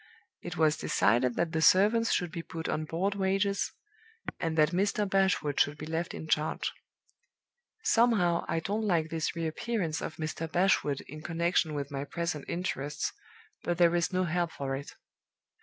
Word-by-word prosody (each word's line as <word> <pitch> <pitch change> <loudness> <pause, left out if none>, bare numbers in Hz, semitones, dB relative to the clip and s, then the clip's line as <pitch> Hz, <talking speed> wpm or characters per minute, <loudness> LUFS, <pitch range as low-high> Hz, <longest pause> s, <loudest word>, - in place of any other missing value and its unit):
It - - -6
was 155 -1 +3
decided 120 +3 +2
that 170 -1 0
the 160 -2 0
servants 215 +7 +5
should 175 -2 0
be 170 -2 -4
put 165 0 -6
on 155 0 -1
board 180 +6 -1
wages, 195 0 0 0.7
and 165 -1 -2
that 155 0 +4
Mr. 200 +3 +1
Bashwood 190 -7 +1
should 145 +1 +2
be 155 - -6
left 165 +2 -3
in 160 - -7
charge. 155 0 0 1.1
(Somehow, 205 -8 +3
I 165 - -1
don't 205 +6 -1
like 165 -4 +1
this 165 0 -1
re 165 -1 -2
appearance 165 0 -2
of - - -5
Mr. 160 0 -4
Bashwood 175 -6 +2
in 155 +2 -10
connection 170 -1 0
with 140 0 -4
my 140 -1 -3
present 170 0 -3
interests, 150 -5 -2 0.5
but 175 - -1
there 170 -1 +5
is 170 -1 +1
no 185 0 +1
help 175 -1 0
for 135 -1 -3
it.) 140 +1 -8
165 Hz, 170 wpm, -30 LUFS, 155-185 Hz, 1.1 s, servants